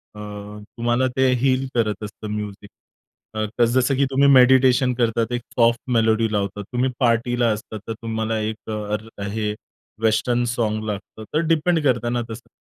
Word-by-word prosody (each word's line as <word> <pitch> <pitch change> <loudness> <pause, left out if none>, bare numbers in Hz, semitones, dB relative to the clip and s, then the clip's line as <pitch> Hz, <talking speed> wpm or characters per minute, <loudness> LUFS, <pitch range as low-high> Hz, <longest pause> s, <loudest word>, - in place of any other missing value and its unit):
अ, - - -10 0.6
तुम्हाला 120 +2 +1
ते 130 -1 +4
हील 135 0 +2
करत 110 -3 0
असतं 105 +1 -7
म्यूझिक. 105 -1 -6 0.7
अ, 110 +2 0
जसं 130 +3 +2
की 140 - +3
तुम्ही 140 +1 +4
मेडिटेशन 130 -1 +5
करतात, 115 -1 0
एक 120 0 -1 0.2
सॉफ्ट 115 0 +4
मेलोडी 110 -1 +2
लावतात, 100 -1 -2
तुम्ही 125 +1 +1
पार्टीला 120 0 +2
असता 110 +1 -5
तर 115 - -2
तुम्हाला 110 0 -3
एक 110 +1 -5
र 105 0 -4
हे 105 0 -2 0.5
वेस्टर्न 120 +2 +2
सॉन्ग 110 -3 -1
लागतं. 105 +1 -6
तर 155 - +2
डिपेंड 165 +1 +2
करताना 120 -2 +1
तसं, 115 +2 -9
115 Hz, 150 wpm, -22 LUFS, 110-125 Hz, 0.7 s, मेडिटेशन